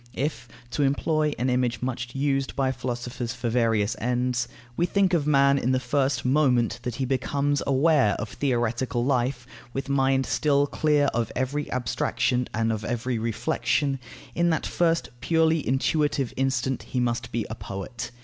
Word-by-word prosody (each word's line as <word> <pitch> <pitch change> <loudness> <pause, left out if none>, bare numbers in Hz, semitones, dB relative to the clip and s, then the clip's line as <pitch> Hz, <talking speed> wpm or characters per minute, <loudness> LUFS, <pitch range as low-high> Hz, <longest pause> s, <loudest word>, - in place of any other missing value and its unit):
If 140 -1 -2 0.2
(to 145 - -1
employ 150 +2 +1
an 125 - 0
image 125 -1 0
much 125 -1 -4
used 135 -1 0
by 135 -1 +1
philosophers 120 -1 -4
for 120 - -2
various 115 -3 +1
ends) 125 +1 0 0.3
we 175 - +1
think 195 0 +2
of 155 -4 +2
man, 140 -1 +4
in 130 +1 +1
the 130 - +2
first 135 0 0
moment 125 -4 +2
that 125 -2 -4
he 130 - -1
becomes 140 +2 0
aware 140 -5 +3
of 105 - -4
theoretical 120 -2 -1
life, 125 -1 0 0.3
with 135 +1 -4
mind 135 -1 +2
still 140 +5 +2
clear 150 0 +2
of 115 0 -1
every 140 +3 -2
abstraction 125 0 0
and 115 +1 0
of 110 -1 -4
every 120 +1 -2
reflexion, 135 +4 0 0.3
in 170 0 +2
that 160 -2 0
first 165 -1 +1
purely 160 +3 +2
intuitive 140 0 +1
instant 130 0 0
he 130 - -3
must 120 -1 -1
be 115 -2 -1
a - - -2
poet. 110 +3 -6
130 Hz, 160 wpm, -26 LUFS, 120-145 Hz, 0.3 s, man